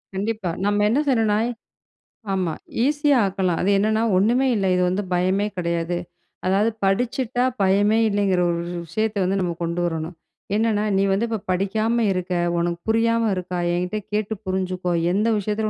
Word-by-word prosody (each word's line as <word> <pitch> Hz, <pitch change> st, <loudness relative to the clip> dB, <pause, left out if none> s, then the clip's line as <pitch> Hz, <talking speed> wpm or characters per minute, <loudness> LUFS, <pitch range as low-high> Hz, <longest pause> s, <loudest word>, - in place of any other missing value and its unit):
கண்டிப்பா 205 Hz, -2 st, -2 dB, 0.2 s
நம்ம 205 Hz, 0 st, +2 dB
என்ன 260 Hz, +6 st, +2 dB
செய்யணும்னா 220 Hz, -5 st, +2 dB, 0.9 s
ஆமா 185 Hz, -4 st, 0 dB, 0.3 s
ஈஸியா 290 Hz, -1 st, +3 dB
ஆக்கலாம். 190 Hz, -3 st, -1 dB
அது 190 Hz, -, +1 dB
என்னன்னா 215 Hz, +2 st, +1 dB
ஒன்னுமே 240 Hz, +8 st, +3 dB
இல்ல 195 Hz, -, 0 dB
இது 180 Hz, -, +1 dB
வந்து 195 Hz, +3 st, -1 dB
பயமே 185 Hz, +3 st, +1 dB
கிடையாது. 170 Hz, 0 st, -1 dB, 0.5 s
அதாவது 200 Hz, +4 st, +2 dB
படிச்சிட்டா 245 Hz, +4 st, 0 dB, 0.2 s
பயமே 205 Hz, +3 st, +3 dB
இல்லைங்கிற 200 Hz, -3 st, +1 dB
ஒரு 170 Hz, 0 st, -1 dB, 0.3 s
விஷயத்த 215 Hz, +6 st, -2 dB
வந்து 190 Hz, +2 st, 0 dB
நம்ம 175 Hz, -2 st, -1 dB
கொண்டு 170 Hz, +1 st, -2 dB
வரணும். 165 Hz, 0 st, -3 dB, 0.4 s
என்னன்னா 215 Hz, -1 st, +1 dB
"நீ 195 Hz, -, +3 dB
வந்து 200 Hz, +4 st, +1 dB
இப்ப 225 Hz, -1 st, -2 dB
படிக்காம 220 Hz, +5 st, +1 dB
இருக்க. 185 Hz, -1 st, -2 dB, 0.2 s
உனக்கு 170 Hz, 0 st, -1 dB
புரியாம 230 Hz, 0 st, +2 dB
இருக்கா 180 Hz, 0 st, -4 dB, 0.2 s
என்கிட்ட 180 Hz, +4 st, -1 dB, 0.2 s
கேட்டு 215 Hz, 0 st, -1 dB
புரிஞ்சுக்கோ, 185 Hz, -1 st, -2 dB, 0.2 s
எந்த 210 Hz, +4 st, +1 dB
விஷயத்தில 210 Hz, +1 st, -1 dB
195 Hz, 150 wpm, -22 LUFS, 180-220 Hz, 0.9 s, ஈஸியா